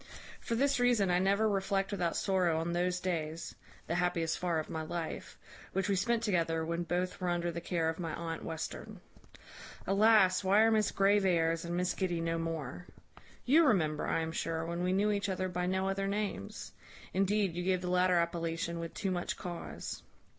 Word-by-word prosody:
"For 230 - -3
this 275 +2 +2
reason, 240 -6 +3
I 175 - +3
never 200 +3 +3
reflect 195 -1 0
without 175 -4 -1
sorrow 185 -4 +2
on 170 +1 -2
those 180 +1 0
days 165 -3 -3 0.3
(the - - -2
happiest 175 -2 0
far 175 -2 0
of 155 - -2
my 160 - -4
life) 165 +1 -5 0.4
which 190 0 0
we 200 - +3
spent 230 +4 +1
together 165 -6 +1
when 170 +1 -2
both 180 +2 -2
were 180 - 0
under 175 0 0
the 170 0 -5
care 170 -2 -1
of 160 +1 -2
my 165 -2 -3
aunt 165 -1 -5
Western. 160 -1 -6 0.9
Alas! 195 -2 +4
why 195 +3 +5
are 225 0 +5
Miss 215 -2 +2
Graveairs 180 -5 +2
and 170 +1 -2
Miss 180 0 0
Giddy 180 -3 -1
no 165 0 -1
more? 165 0 -4 0.6
You 305 +7 +6
remember, 155 - +1
I - - +1
am 160 0 -3
sure, 165 0 -2
when 170 +1 -3
we 180 +1 +1
knew 205 +3 +2
each 200 -1 -1
other 185 0 -1
by 180 0 -2
no 190 +1 0
other 195 0 -1
names. 200 - -4 0.4
Indeed, 195 0 +1
you 175 +1 -3
gave 185 0 +1
the 180 - -4
latter 180 0 +3
appellation 170 0 -1
with 165 0 -6
too 195 - -1
much 175 -1 -2
cause. 175 -2 -6
180 Hz, 190 wpm, -32 LUFS, 165-195 Hz, 0.9 s, You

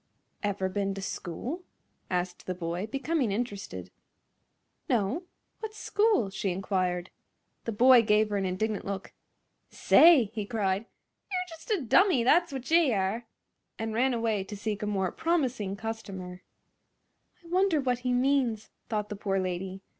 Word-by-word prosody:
"Ever 200 -2 -1
ben 195 0 -2
to 195 - -5
school?" 230 - -5 0.5
asked 180 -1 -2
the 185 - -2
boy, 175 +3 -3
becoming 275 -1 -1
interested. 195 - -4 1.0
"No; 240 - 0 0.3
what's 435 -1 -6
school?" 415 - +2
she 195 +1 -2
inquired. 185 -1 -1 0.5
The 230 - -1
boy 245 +3 +7
gave 215 -1 +3
her 205 - +1
an 195 - -1
indignant 205 +3 -1
look. 195 -1 -5 0.6
"Say!" 300 -11 +6
he 215 -2 -2
cried, 200 -1 -1 0.4
"ye'r 365 -1 0
just 330 +4 -12
a 415 -6 +1
dummy, 340 - +4
that's 340 +7 +4
wot 265 +1 -6
ye 330 -5 +5
are!" 205 +4 -1 0.5
and 225 0 -3
ran 250 +3 +2
away 225 -4 0
to 205 +1 -7
seek 210 +1 -3
a 210 - -2
more 190 -3 0
promising 255 - 0
customer. 195 -4 -6 1.0
"I - - -15
wonder 365 -2 +3
that 250 -3 0
he 250 0 -1
means," 250 -3 +1 0.2
thought 210 -2 -2
the 210 - -4
poor 195 -1 -1
lady. 185 +1 -4
215 Hz, 150 wpm, -29 LUFS, 195-260 Hz, 1.0 s, boy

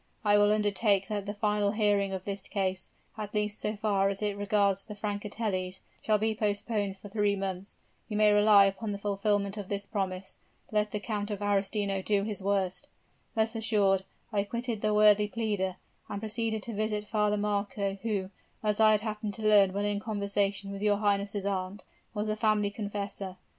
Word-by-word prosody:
I 205 0 +5
will 205 0 +5
undertake 205 -1 +2
that 205 -2 -3
the 205 - -2
final 210 -1 +1
hearing 205 -2 +2
of 190 -1 -5
this 200 -1 -5
case, 190 -2 -2 0.3
at 210 0 -5
least 210 0 -1
so 210 +1 -1
far 200 -2 +1
as 200 +1 -2
it 205 -1 0
regards 200 -1 +1
the 210 - -9
Francatellis, 205 -2 -3 0.2
shall 215 -1 +3
be 220 +1 +1
postponed 205 -1 -1
for 205 - -11
three 205 0 +1
months. 195 0 -5 0.3
You 210 - -2
may 210 0 +5
rely 205 -1 +7
upon 205 +2 -2
the - - -3
fulfillment 200 0 0
of 205 -2 -6
this 200 0 -3
promise, 190 -2 -4 0.3
let 210 -1 +1
the 210 - -3
Count 205 -1 -3
of 205 -2 -3
Arestino 200 -1 0
do 200 -1 +2
his 210 -1 -3
worst.' 190 -2 -1 0.5
Thus 220 0 +1
assured, 205 -4 +2 0.3
I 200 -1 +2
quitted 235 +1 -3
the 215 - +1
worthy 210 0 +6
pleader, 205 -4 -1 0.3
and 200 - -3
proceeded 220 0 -1
to 235 - -5
visit 210 0 -1
Father 210 -1 +1
Marco, 200 -1 -1
who, 200 -4 -2 0.3
as 210 0 +1
I 215 -1 +7
had 210 - +2
happened 215 -2 -3
to 220 - -7
learn 205 -3 +6
when 200 +2 -1
in 205 0 0
conversation 200 -2 -1
with 200 0 -6
your 205 -1 +3
highness' 200 -1 0
aunt, 190 0 -2 0.3
was 210 0 -1
the 215 0 -1
family 215 -2 +2
confessor. 200 -2 -5
205 Hz, 185 wpm, -29 LUFS, 200-210 Hz, 0.5 s, rely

